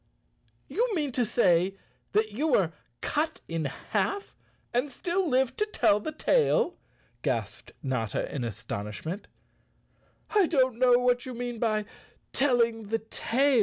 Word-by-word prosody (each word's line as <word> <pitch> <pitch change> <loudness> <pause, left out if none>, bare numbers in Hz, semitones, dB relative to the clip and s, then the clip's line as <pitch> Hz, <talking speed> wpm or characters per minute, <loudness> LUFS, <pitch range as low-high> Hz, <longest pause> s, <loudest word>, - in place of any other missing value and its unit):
"You 470 -2 0
mean 295 -5 0
to 245 -2 +1
say 185 -4 +3 0.4
that 215 +1 +2
you 275 +10 -1
were 190 - +3 0.3
cut 315 +2 -1
in 165 -2 -2
half 400 - -2 0.4
and 250 +4 +1
still 350 +6 0
live 260 -1 +2
to 425 - +2
tell 210 - +3
the 310 - -4
tale?" 475 +8 +2 0.5
gasped - - -3
Notta 125 -6 -1
in 135 - -2
astonishment. 115 - -5 1.0
"I 410 -5 +4
don't 260 -7 +2
know 255 -1 +6
what 245 0 +2
you 255 - -5
mean 240 -1 -4
by 215 -2 +1 0.5
telling 235 -5 +2
the 225 +2 +1
tail. 245 +4 +1
245 Hz, 135 wpm, -28 LUFS, 200-290 Hz, 1.0 s, know